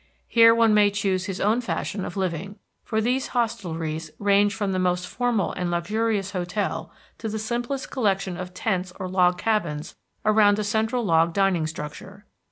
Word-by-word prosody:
Here 230 -1 +6
one 230 -2 +4
may 210 -1 +5
choose 195 -2 -1
his 190 -1 -4
own 220 +4 +2
fashion 200 -4 -3
of 175 - -7
living, 190 +1 -3 0.3
for 220 0 -1
these 250 +4 0
hostelries 165 -9 -2
range 205 0 +3
from 205 -3 -1
the 185 - 0
most 180 -1 0
formal 240 -4 0
and 180 -1 -2
luxurious 205 +3 -1
hotel 180 +2 -3 0.3
to 220 - -3
the 215 - -3
simplest 240 +4 -3
collection 195 -6 0
of 180 +1 -6
tents 185 -1 -2
or 185 - -3
log 180 -1 +3
cabins 175 -9 -1 0.3
around 210 -1 +5
a 215 - -1
central 220 +3 0
log 165 -2 +3
dining 190 -5 +2
structure. 160 +6 -8
200 Hz, 170 wpm, -24 LUFS, 180-220 Hz, 0.3 s, Here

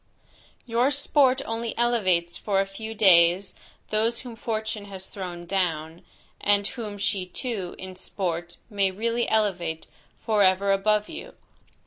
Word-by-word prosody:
Your 240 +2 +2
sport 280 -2 +3
only 225 0 -4
elevates 185 -8 +2
for 200 -2 0
a 195 - +2
few 220 +3 -7
days, 185 -2 +5 0.4
those 225 +2 +1
whom 245 -3 -9
fortune 220 -2 -3
has 190 -2 -7
thrown 180 -3 -7
down, 165 -3 -2 0.4
and 205 0 +3
whom 215 -2 -5
she 200 -1 0
too, 195 -2 -4
in 185 0 -8
sport, 175 -2 -4
may 200 -3 +1
really 230 +5 -1
elevate 180 -7 0 0.3
forever 200 -2 +3
above 210 +2 +2
you. - - -9
200 Hz, 130 wpm, -26 LUFS, 185-225 Hz, 0.4 s, days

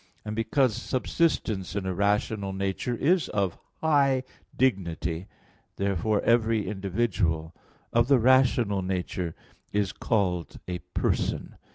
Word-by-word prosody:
And 105 0 -4
because 120 +1 +2
subsistence 115 - 0
in 100 -2 -2
a 95 - -1
rational 100 +1 0
nature 95 +5 -2
is 165 +7 +2
of 100 -4 -1 0.2
high 140 -4 +3 0.3
dignity, 90 - 0 0.5
therefore 100 +2 0
every 115 -2 +2
individual 95 -5 -1 0.4
of 120 0 +4
the 140 -1 +6
rational 120 -5 +4
nature 90 -2 -3 0.4
is 100 -2 0
called 90 -7 -1
a 90 -1 -3 0.2
"person." - - -1
100 Hz, 110 wpm, -27 LUFS, 95-120 Hz, 0.5 s, the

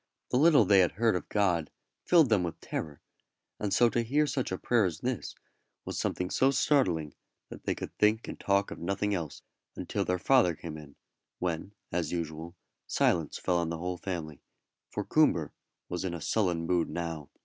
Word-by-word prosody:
The - - +3
little 150 -7 +6
they 100 +1 +5
had 90 - +3
heard 115 0 +2
of 90 - -4
God 90 -7 +1 0.4
filled 165 -7 +6
them 105 -4 +3
with 85 -2 -4
terror, 75 -2 -5 0.6
and 105 -2 -2
so 120 - +5
to 120 - +1
hear 140 +6 +2
such 135 -6 -2
a 95 - -1
prayer 115 0 +2
as 85 -4 -3
this 125 -4 -3 0.5
was - - -4
something 90 0 -2
so 135 - +3
startling 90 - +2 0.4
that - - -11
they - - 0
could - - -7
think 110 +2 +3
and - - -7
talk 100 0 +1
of - - -7
nothing 100 +4 -1
else 80 -6 -4 0.3
until - - -2
their 90 - 0
father 90 -3 +3
came 80 0 -7
in, 75 -2 -11 0.4
when, 90 +3 -3 0.2
as 85 -3 -1
usual, 85 0 -4 0.3
silence 80 -4 +1
fell 90 -1 0
on 85 -1 0
the 85 - -3
whole 90 +2 -3
family, 85 -6 -5 0.5
for - - -4
Coomber - - +3 0.4
was 90 - -3
in 90 -2 -2
a - - -5
sullen 90 -2 0
mood 85 -1 +1
now. 80 -4 -4
90 Hz, 190 wpm, -30 LUFS, 85-110 Hz, 0.6 s, little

